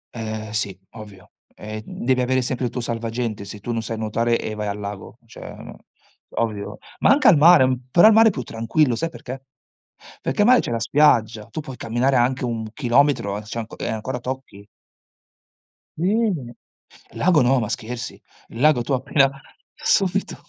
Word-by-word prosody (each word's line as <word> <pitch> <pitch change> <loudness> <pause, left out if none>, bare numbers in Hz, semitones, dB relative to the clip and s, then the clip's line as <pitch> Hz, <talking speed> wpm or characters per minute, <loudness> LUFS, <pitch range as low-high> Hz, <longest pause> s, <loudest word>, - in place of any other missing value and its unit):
Eh 110 -1 -5
sì, 100 -4 -2
ovvio. 105 -4 -13 0.2
Ehm, 110 0 -7 0.2
devi 130 0 +2
avere 130 +1 +1
sempre 125 +1 -2
il 120 - -2
tuo 125 - -4
salvagente 115 -2 -3
se 105 +1 -9
tu 120 +4 -5
non 115 -1 -1
sai 115 0 -5
nuotare 115 +2 0
e 110 - -4
vai 105 -1 -4
al 100 - -3
lago, 100 -1 -7
cioè - - -14 0.2
no, - - -11 0.6
ovvio. 105 -2 -3 0.2
Ma - - +3
anche 275 -1 +5
al 195 - +8
mare 155 -2 +7
m 130 -1 -2
però 175 +9 +6
al 220 - +8
mare 225 +1 +7
è 220 - +4
più 130 - -5
tranquillo, 115 +4 0
sai 165 +8 -2
perché: 135 -4 -9 0.8
perché 135 +10 -1
al 205 - +4
mare 255 0 +7
c'è - - -5
la 115 - -1
spiaggia, 115 -5 +2
tu 155 - -4
puoi 135 -4 -9
camminare 120 +4 0
anche 125 +1 +1
1 110 -2 -4
chilometro 125 -6 +1
e - - -8
c'è 110 +2 -8
anco 110 - -7
e - - -3
ancora 115 +3 -4
tocchi. 125 -5 -7 1.3
Mh. 185 - 0 0.6
Il - - -11
lago 170 -4 +4
no, 130 +1 +3
ma 110 - -3
scherzi. 125 +2 -5 0.3
Il 115 - -9
lago 150 -4 +4
tu 120 - -2
appena 135 +1 +2 0.5
subito. 200 -11 0
120 Hz, 185 wpm, -22 LUFS, 110-140 Hz, 1.3 s, al